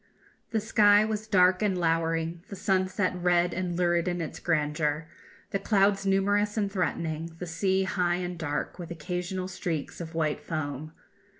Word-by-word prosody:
The 225 Hz, -, 0 dB
sky 210 Hz, -1 st, +5 dB
was 215 Hz, 0 st, -3 dB
dark 185 Hz, -2 st, +4 dB
and 200 Hz, -3 st, +1 dB
lowering, 165 Hz, 0 st, 0 dB
the 200 Hz, -, -6 dB
sunset 190 Hz, -1 st, +1 dB
red 175 Hz, 0 st, +2 dB
and 180 Hz, -1 st, -2 dB
lurid 175 Hz, -1 st, +2 dB
in 175 Hz, 0 st, -1 dB
its 165 Hz, -, -5 dB
grandeur, 150 Hz, -1 st, 0 dB, 0.5 s
the 195 Hz, -, 0 dB
clouds 195 Hz, -1 st, +2 dB
numerous 205 Hz, +2 st, +2 dB
and 200 Hz, -2 st, 0 dB
threatening, 165 Hz, -3 st, -2 dB
the 180 Hz, -, -5 dB
sea 190 Hz, +3 st, +1 dB
high 180 Hz, -2 st, +1 dB
and 180 Hz, 0 st, -3 dB
dark, 160 Hz, +1 st, -3 dB
with 170 Hz, -, -6 dB
occasional 180 Hz, +3 st, -3 dB
streaks 175 Hz, -4 st, -4 dB
of 165 Hz, 0 st, -7 dB
white 155 Hz, -2 st, 0 dB
foam. 155 Hz, -1 st, -4 dB
180 Hz, 160 wpm, -28 LUFS, 165-195 Hz, 0.5 s, sky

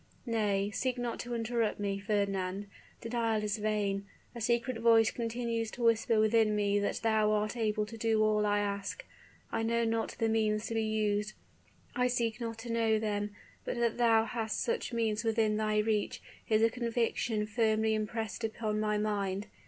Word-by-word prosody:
Nay, 205 Hz, -4 st, 0 dB
seek 255 Hz, +2 st, -1 dB
not 240 Hz, -1 st, -3 dB
to 240 Hz, -1 st, -4 dB
interrupt 230 Hz, -2 st, -1 dB
me, 200 Hz, -1 st, -1 dB
Fernand, 200 Hz, -1 st, -1 dB, 0.4 s
denial 230 Hz, -2 st, 0 dB
is 210 Hz, +1 st, -1 dB
vain! 205 Hz, -2 st, -1 dB, 0.3 s
A 235 Hz, -, -7 dB
secret 235 Hz, +1 st, 0 dB
voice 225 Hz, -1 st, +5 dB
continues 230 Hz, -1 st, -2 dB
to 240 Hz, -, -6 dB
whisper 230 Hz, -1 st, +3 dB
within 215 Hz, 0 st, +3 dB
me 205 Hz, -1 st, +2 dB
that 205 Hz, -, -1 dB
thou 220 Hz, -1 st, +3 dB
art 215 Hz, +2 st, 0 dB
able 215 Hz, -2 st, 0 dB
to 225 Hz, +1 st, -10 dB
do 220 Hz, -1 st, +2 dB
all 215 Hz, 0 st, +3 dB
I 205 Hz, 0 st, +2 dB
ask; 205 Hz, -, -3 dB, 0.5 s
I -, -, -1 dB
know 230 Hz, +1 st, +1 dB
not 225 Hz, 0 st, -1 dB
the 225 Hz, -, +1 dB
means 215 Hz, -1 st, +1 dB
to -, -, -3 dB
be 225 Hz, -, +1 dB
used 215 Hz, -1 st, 0 dB, 0.6 s
I 250 Hz, 0 st, +2 dB
seek 240 Hz, -1 st, -1 dB
not 230 Hz, -1 st, -4 dB
to 235 Hz, -, -4 dB
know 225 Hz, -1 st, +2 dB
them; 205 Hz, -1 st, -2 dB, 0.3 s
but -, -, -3 dB
that 235 Hz, 0 st, 0 dB
thou 225 Hz, -2 st, +4 dB
hast 225 Hz, -2 st, -3 dB
such 470 Hz, -, -1 dB
means 225 Hz, -2 st, 0 dB
within 220 Hz, -2 st, +2 dB
thy 215 Hz, 0 st, 0 dB
reach, 210 Hz, -1 st, 0 dB, 0.3 s
is 220 Hz, 0 st, +4 dB
a 225 Hz, -, +4 dB
conviction 230 Hz, -2 st, -1 dB
firmly 220 Hz, 0 st, +1 dB
impressed 220 Hz, +1 st, -3 dB
upon 215 Hz, -1 st, -2 dB
my 210 Hz, 0 st, +1 dB
mind. 205 Hz, -2 st, -1 dB
220 Hz, 175 wpm, -31 LUFS, 210-230 Hz, 0.6 s, voice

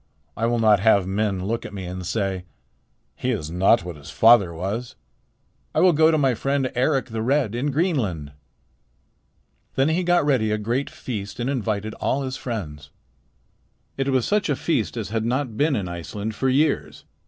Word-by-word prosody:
'I 115 Hz, -, 0 dB
will 120 Hz, 0 st, +1 dB
not 110 Hz, -3 st, +4 dB
have 100 Hz, -2 st, +4 dB
men 95 Hz, -1 st, -1 dB
look 115 Hz, +3 st, -2 dB
at 100 Hz, -, -8 dB
me 95 Hz, -2 st, -5 dB
and 90 Hz, +1 st, -6 dB
say, 95 Hz, 0 st, -2 dB, 0.7 s
"He 125 Hz, -, -3 dB
is 90 Hz, -11 st, -2 dB
not 95 Hz, +3 st, +3 dB
what 85 Hz, -3 st, -6 dB
his 75 Hz, +1 st, -12 dB
father 110 Hz, -4 st, +5 dB
was." 100 Hz, +9 st, -4 dB, 0.8 s
I -, -, +3 dB
will 180 Hz, -1 st, +5 dB
go 160 Hz, +1 st, +5 dB
to 160 Hz, -, +3 dB
my 135 Hz, -4 st, +3 dB
friend 135 Hz, +2 st, -1 dB
Eric 135 Hz, +2 st, +1 dB
the 110 Hz, 0 st, -3 dB
Red 130 Hz, -2 st, +1 dB
in 125 Hz, +5 st, -1 dB
Greenland.' 130 Hz, -, -1 dB, 1.4 s
"Then 135 Hz, +3 st, +3 dB
he 170 Hz, +3 st, +1 dB
got 175 Hz, -3 st, +3 dB
ready 130 Hz, -7 st, +2 dB
a 105 Hz, -, +1 dB
great 120 Hz, +6 st, -1 dB
feast 105 Hz, -3 st, -6 dB
and 120 Hz, +3 st, -1 dB
invited 110 Hz, -4 st, -2 dB
all 140 Hz, +1 st, 0 dB
his 130 Hz, -1 st, -4 dB
friends. 75 Hz, -, -6 dB, 1.1 s
It 135 Hz, 0 st, -1 dB
was 130 Hz, -3 st, +2 dB
such 210 Hz, -4 st, +1 dB
a 145 Hz, -, +2 dB
feast 125 Hz, -6 st, -1 dB
as 110 Hz, -4 st, -4 dB
had 110 Hz, 0 st, -1 dB
not 125 Hz, 0 st, -1 dB
been 145 Hz, +3 st, +2 dB
in 100 Hz, -6 st, -2 dB
Iceland 95 Hz, +5 st, -5 dB
for 130 Hz, +5 st, 0 dB
years. 145 Hz, +3 st, 0 dB
115 Hz, 185 wpm, -23 LUFS, 100-135 Hz, 1.4 s, father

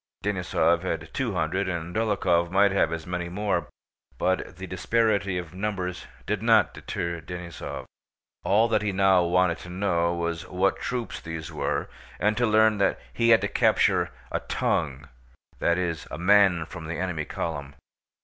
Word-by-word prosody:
Denísov 90 Hz, -4 st, +1 dB
had 80 Hz, -3 st, -4 dB
two 125 Hz, -6 st, -1 dB
hundred, 90 Hz, +4 st, 0 dB
and 85 Hz, 0 st, -4 dB
Dólokhov 95 Hz, -6 st, +2 dB
might 100 Hz, +2 st, +4 dB
have 100 Hz, -4 st, +2 dB
as 80 Hz, -1 st, -4 dB
many 90 Hz, -1 st, -3 dB
more, 95 Hz, -1 st, -1 dB, 0.5 s
but 95 Hz, -3 st, -1 dB
the 95 Hz, -, -6 dB
disparity 100 Hz, 0 st, +1 dB
of 85 Hz, -3 st, -6 dB
numbers 95 Hz, -2 st, -3 dB, 0.2 s
did -, -, -1 dB
not -, -, +4 dB
deter 85 Hz, -1 st, -4 dB
Denísov. 90 Hz, 0 st, -7 dB, 0.6 s
All 110 Hz, +4 st, +4 dB
that 110 Hz, -2 st, +2 dB
he 105 Hz, -1 st, 0 dB
now 95 Hz, -1 st, +4 dB
wanted 85 Hz, 0 st, +2 dB
to 90 Hz, -, -10 dB
know 90 Hz, -2 st, +1 dB
was 85 Hz, -1 st, -3 dB
what 95 Hz, +2 st, +1 dB
troops 125 Hz, -2 st, -3 dB
these 80 Hz, -1 st, -6 dB
were -, -, -2 dB, 0.3 s
and 105 Hz, +1 st, +2 dB
to 120 Hz, +1 st, +2 dB
learn 110 Hz, -1 st, +4 dB
that 100 Hz, -, +2 dB
he 115 Hz, 0 st, +2 dB
had 115 Hz, -, +7 dB
to -, -, 0 dB
capture -, -, +3 dB, 0.2 s
a -, -, 0 dB
"tongue"—that 65 Hz, +4 st, -2 dB
is, 85 Hz, -3 st, -2 dB
a -, -, -6 dB
man 95 Hz, -2 st, +4 dB
from 85 Hz, -1 st, -8 dB
the 85 Hz, -, -3 dB
enemy 85 Hz, -4 st, -2 dB
column. 70 Hz, -4 st, -4 dB
90 Hz, 160 wpm, -26 LUFS, 85-100 Hz, 0.6 s, had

